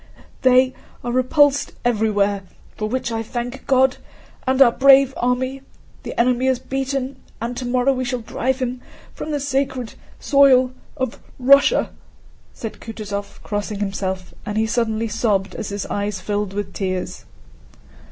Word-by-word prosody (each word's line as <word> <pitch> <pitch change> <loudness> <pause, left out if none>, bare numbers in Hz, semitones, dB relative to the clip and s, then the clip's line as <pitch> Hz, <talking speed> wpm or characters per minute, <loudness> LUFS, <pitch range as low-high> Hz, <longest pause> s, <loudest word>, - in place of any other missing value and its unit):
"They 255 0 +5 0.3
are 240 - -2
repulsed 280 +3 +3
everywhere, 205 -4 +1 0.3
for 215 0 -3
which 255 0 -2
I 225 0 -1
thank 245 +3 -5
God 265 -1 +4 0.5
and 260 0 +2
our 260 -3 +8
brave 270 +1 +6
army! 255 +2 -1 0.4
The - - -6
enemy 250 +2 +2
is 260 -1 +3
beaten, 270 +1 -3 0.2
and 235 +2 -3
tomorrow 250 +2 +1
we 255 0 -2
shall 250 -1 -2
drive 255 +3 -1
him 255 -1 -3 0.3
from - - -6
the 295 -1 -1
sacred 265 -3 -1 0.3
soil 265 -3 +5 0.3
of 260 -3 -3 0.2
Russia," 280 - +5 0.6
said 225 - -7
Kutúzov 205 -3 -6
crossing 205 0 -3
himself, 190 -2 -3
and 210 0 -4
he 220 - +3
suddenly 225 -1 0
sobbed 210 -3 0
as - - -5
his 200 0 -4
eyes 205 0 -2
filled 205 -2 -2
with 205 +1 -4
tears. 185 -2 -3
245 Hz, 140 wpm, -21 LUFS, 215-265 Hz, 0.6 s, our